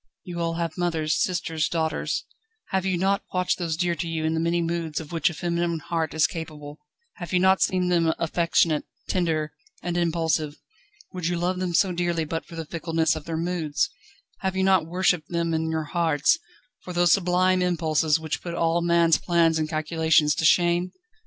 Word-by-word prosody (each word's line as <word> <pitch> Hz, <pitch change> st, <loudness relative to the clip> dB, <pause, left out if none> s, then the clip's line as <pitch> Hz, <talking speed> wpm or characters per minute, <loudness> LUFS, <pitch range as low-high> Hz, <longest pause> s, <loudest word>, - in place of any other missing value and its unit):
You 175 Hz, -1 st, -6 dB
all 165 Hz, 0 st, -1 dB
have 170 Hz, 0 st, -3 dB
mothers, 160 Hz, -3 st, 0 dB
sisters, 160 Hz, -3 st, -1 dB
daughters 160 Hz, -2 st, -1 dB, 0.4 s
have 190 Hz, 0 st, 0 dB
you 185 Hz, -2 st, +1 dB
not 195 Hz, +2 st, +1 dB
watched 180 Hz, 0 st, 0 dB
those 165 Hz, -3 st, -2 dB
dear 175 Hz, 0 st, +1 dB
to 170 Hz, +1 st, -4 dB
you 160 Hz, -1 st, -2 dB
in 160 Hz, -, +1 dB
the 160 Hz, -, 0 dB
many 170 Hz, +1 st, +1 dB
moods 165 Hz, -2 st, -2 dB
of 160 Hz, -1 st, -9 dB
which 165 Hz, 0 st, +2 dB
a -, -, -6 dB
feminine 170 Hz, 0 st, -1 dB
heart 160 Hz, 0 st, -3 dB
is 155 Hz, -1 st, +4 dB
capable; 155 Hz, -2 st, -6 dB, 0.4 s
have 175 Hz, -5 st, -7 dB
you 180 Hz, -, +3 dB
not 190 Hz, +1 st, +4 dB
seen 180 Hz, -1 st, +2 dB
them 165 Hz, -2 st, +3 dB
affectionate, 165 Hz, -2 st, +1 dB, 0.2 s
tender, 160 Hz, -4 st, 0 dB, 0.3 s
and 175 Hz, 0 st, -2 dB
impulsive? 165 Hz, -3 st, 0 dB, 0.6 s
Would 180 Hz, -3 st, -3 dB
you 175 Hz, 0 st, 0 dB
love 180 Hz, +2 st, -1 dB
them 180 Hz, -2 st, -1 dB
so 190 Hz, -, +3 dB
dearly 175 Hz, -2 st, -1 dB
but 165 Hz, +2 st, -4 dB
for 170 Hz, -, -10 dB
the 165 Hz, -1 st, -5 dB
fickleness 165 Hz, 0 st, 0 dB
of 155 Hz, -1 st, -7 dB
their 165 Hz, -1 st, -3 dB
moods? 170 Hz, -, -1 dB, 0.5 s
Have 190 Hz, -1 st, -2 dB
you 190 Hz, -, +1 dB
not 190 Hz, -4 st, +3 dB
worshipped 180 Hz, -2 st, +1 dB
them 170 Hz, -1 st, -1 dB
in 160 Hz, 0 st, 0 dB
your 160 Hz, -1 st, -1 dB
hearts, 165 Hz, -, +2 dB, 0.4 s
for 180 Hz, -, -8 dB
those 175 Hz, -1 st, +3 dB
sublime 185 Hz, 0 st, +2 dB
impulses 160 Hz, -3 st, +1 dB
which 160 Hz, -1 st, -4 dB
put 170 Hz, -1 st, -5 dB
all 170 Hz, 0 st, +1 dB
man's 170 Hz, -1 st, +3 dB
plans 165 Hz, -2 st, +2 dB
and 155 Hz, -1 st, -1 dB
calculations 155 Hz, -1 st, +2 dB
to 160 Hz, -, -1 dB
shame? 175 Hz, +2 st, +3 dB
170 Hz, 190 wpm, -25 LUFS, 160-175 Hz, 0.6 s, is